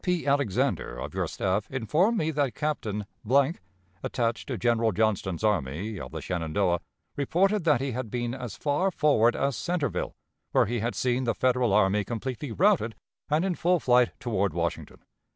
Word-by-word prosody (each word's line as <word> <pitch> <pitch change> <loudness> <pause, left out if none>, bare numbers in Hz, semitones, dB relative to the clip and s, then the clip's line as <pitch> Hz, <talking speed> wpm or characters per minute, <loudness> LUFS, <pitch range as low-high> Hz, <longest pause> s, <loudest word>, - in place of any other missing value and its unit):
P. 180 -2 0
Alexander, 140 - 0
of 65 - -6
your - - -1
staff, 95 +2 -1
informed 155 - +1
me 160 -3 0
that 145 -4 0
Captain, 110 -9 -2 1.0
attached 115 -2 -1
to 130 - -3
General 115 +2 +2
Johnston's 100 -3 0
Army 100 +1 -1
of - - -7
the - - -5
Shenandoah, 85 +1 0 0.4
reported 185 +7 +1
that 150 -6 +4
he 135 0 -1
had 125 -1 -4
been 120 +1 -2
as 125 -5 -6
far 150 +6 +1
forward 140 - +3
as 140 -2 0
Centreville, 170 - -2 0.4
where - - +5
he 120 +3 -2
had 115 +3 -2
seen 125 0 0
the 115 -2 0
Federal 125 -3 +2
army 105 0 +3
completely 125 +5 -4
routed 165 - +2 0.3
and 155 +4 +2
in 190 - +1
full 175 +1 +2
flight 125 -3 +4
toward 100 -7 -1
Washington. 85 -1 -3
120 Hz, 165 wpm, -27 LUFS, 105-145 Hz, 1.0 s, where